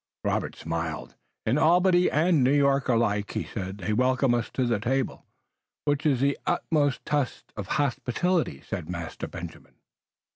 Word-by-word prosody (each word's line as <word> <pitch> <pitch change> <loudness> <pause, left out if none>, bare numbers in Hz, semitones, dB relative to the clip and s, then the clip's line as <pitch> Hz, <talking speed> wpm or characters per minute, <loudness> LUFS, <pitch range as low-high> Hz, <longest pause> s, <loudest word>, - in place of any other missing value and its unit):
Robert - - -1
smiled. 80 -1 -4 0.3
"In 125 +7 +2
Albany 180 +2 +4
and 155 -2 +3
New 130 - +4
York 140 -2 +3
alike," 105 -4 +1
he - - -1
said, 95 -2 -6
"they 100 +2 -2
welcome 130 +2 +2
us 120 -1 -1
to 130 - +1
the 115 -3 +1
table." 130 +3 -2 0.6
"Which 145 +1 +1
is 135 -4 +2
the 140 0 +1
utmost 150 -5 +1
test 145 -4 -2
of 105 -2 -5
hospitality," 145 - 0
said 90 -4 -5
Master 85 -2 -5
Benjamin. - - -9
130 Hz, 150 wpm, -27 LUFS, 105-145 Hz, 0.6 s, Albany